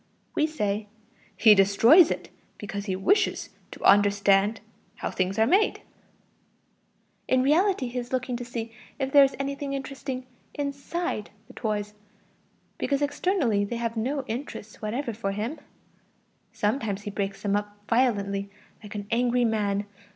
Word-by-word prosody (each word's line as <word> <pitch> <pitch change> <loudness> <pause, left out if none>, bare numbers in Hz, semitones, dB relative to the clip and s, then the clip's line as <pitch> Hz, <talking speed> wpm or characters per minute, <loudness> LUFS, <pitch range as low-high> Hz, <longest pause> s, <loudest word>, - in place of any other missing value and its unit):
We 305 - +2
say: 210 -8 -2 0.5
"He 215 -1 +8
destroys 225 - +6
it - - -4 0.3
because 205 -1 -5
he 190 -3 -1
wishes 400 - +1 0.2
to - - -11
understand 200 +1 +4 0.4
[how - - -4
things 185 +2 -1
are 220 - +4
made];" 385 - +2 1.5
in 255 0 +3
reality 325 0 +2
he 245 +1 -3
is 240 0 -7
looking 255 -1 -1
to 245 - -6
see 235 -1 -6 0.2
if 270 -1 -2
there 285 0 +8
is 275 - +1
anything 275 0 -3
interesting 270 -1 -5 0.3
inside 280 - -3 0.2
the - - -15
toys, 210 -2 -3 0.9
because 280 0 0
externally 285 - +1
they 205 +4 -3
have 230 0 -2
no 265 +5 -1
interest 225 -3 -6
whatever 235 +3 -3
for 195 -2 -3
him; 225 +10 -4 0.9
sometimes 210 -2 -1
he 205 - -5
breaks 195 -1 -4
them 200 -1 +1
up 205 0 -3
violently, 200 -5 +1 0.3
like 210 -1 -10
an 205 -1 -4
angry 245 +1 +2
man. 205 -2 0
230 Hz, 145 wpm, -26 LUFS, 205-275 Hz, 1.5 s, He